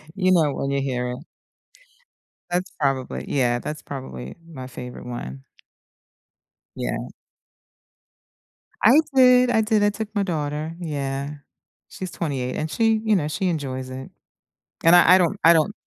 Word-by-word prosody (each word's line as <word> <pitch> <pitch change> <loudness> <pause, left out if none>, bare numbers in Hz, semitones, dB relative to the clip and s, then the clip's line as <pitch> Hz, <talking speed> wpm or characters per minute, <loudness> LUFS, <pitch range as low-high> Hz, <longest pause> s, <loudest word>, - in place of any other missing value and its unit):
You 185 -2 +2
know 160 -5 +3
it - - -5
when 135 - -2
you 140 0 0
hear 125 -2 -2
it. 125 - -5 1.3
That's 180 +2 -1
probably 135 -3 -1
yeah, 120 -3 +1
that's 150 +4 -6
probably 95 - -7
my 135 -6 -9
favorite 125 -1 -9
one. 70 - -7 1.3
Yeah. - - -4 1.7
I 250 +8 +7
did, 250 -1 +6
I 225 -2 +3
did, 215 -1 +2
I 205 - +4
took 215 +1 -6
my 205 - +2
daughter. 155 -2 -3
Yeah. 140 -3 -3 0.5
She's 185 - -6
28 135 -6 -3
and 155 - -2
she 225 -1 +2
you 215 -1 +4
know, 150 - -1
she 185 +5 -1
enjoys 130 -5 -3
it, 130 +1 -7 0.7
and 165 +1 +7
I 175 +1 +8
I - - +7
don't 175 -3 +1
I 165 - +8
don't 165 +5 +2
150 Hz, 150 wpm, -23 LUFS, 130-185 Hz, 1.7 s, I